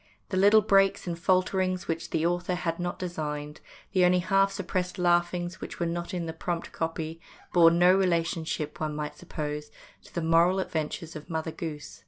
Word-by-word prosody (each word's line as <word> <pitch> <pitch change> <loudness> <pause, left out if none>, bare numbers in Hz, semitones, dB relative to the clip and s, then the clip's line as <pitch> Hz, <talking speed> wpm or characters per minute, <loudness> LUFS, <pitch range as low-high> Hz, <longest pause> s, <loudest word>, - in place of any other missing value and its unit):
The 185 - -1
little 205 +3 +6
breaks 195 -1 +3
and 175 -2 -2
falterings 185 0 +1
which 165 0 -3
the 160 0 0
author 175 +1 0
had 165 -1 -2
not 175 0 -3
designed, 150 -4 -5 0.3
the 185 -2 +3
only 180 0 +5
half 195 +2 +3
suppressed 185 -1 -3
laughings 175 0 +1
which - - -7
were 170 - +1
not 170 +2 -3
in 175 -3 -3
the 160 - -4
prompt 170 +1 -4
copy, 165 0 -4 0.3
bore 170 -2 +8
no 175 +2 +5
relationship, 165 -4 0
one 155 -1 -2
might 150 0 -4
suppose, 150 -3 -5 0.4
to - - -16
the 170 - -1
moral 170 +3 +4
adventures 160 -2 -3
of 155 +3 -9
Mother 160 -1 -2
Goose. 150 - -7
175 Hz, 180 wpm, -28 LUFS, 160-185 Hz, 0.4 s, bore